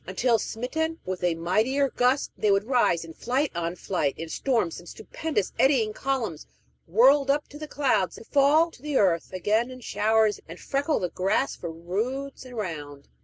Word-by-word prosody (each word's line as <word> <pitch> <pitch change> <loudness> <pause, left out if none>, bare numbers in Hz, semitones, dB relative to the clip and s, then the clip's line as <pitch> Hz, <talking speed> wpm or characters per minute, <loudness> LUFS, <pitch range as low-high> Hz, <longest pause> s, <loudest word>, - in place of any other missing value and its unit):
until, 230 +5 +2
smitten 320 +10 -3
with 185 -1 -4
a 175 -2 +2
mightier 220 +12 +1
gust, 250 +3 +1
they 210 - 0
would 200 0 +3
rise 225 -9 +2
in 165 - -10
flight 260 - -1
on 170 0 -3
flight, 165 -7 -1
in 165 - -5
storms 225 -2 -1
and 175 - -12
stupendous, 315 -11 -3
eddying 250 -6 +3
columns, 235 - -3 0.4
whirled 265 - +5
up 290 +1 +1
to 295 - -12
the 305 - -6
clouds, 220 - +1
to - - -11
fall 290 +6 +3
to 250 - -17
the 295 -1 -1
earth 175 -5 +2
again 215 +6 0
in 255 0 -9
showers, 220 -2 +1
and 170 - -9
freckle 285 +3 0
the 180 - -1
grass 195 +10 0
for 170 - -6
roods 235 +12 -4
around. 155 - -6
225 Hz, 175 wpm, -26 LUFS, 180-275 Hz, 0.4 s, whirled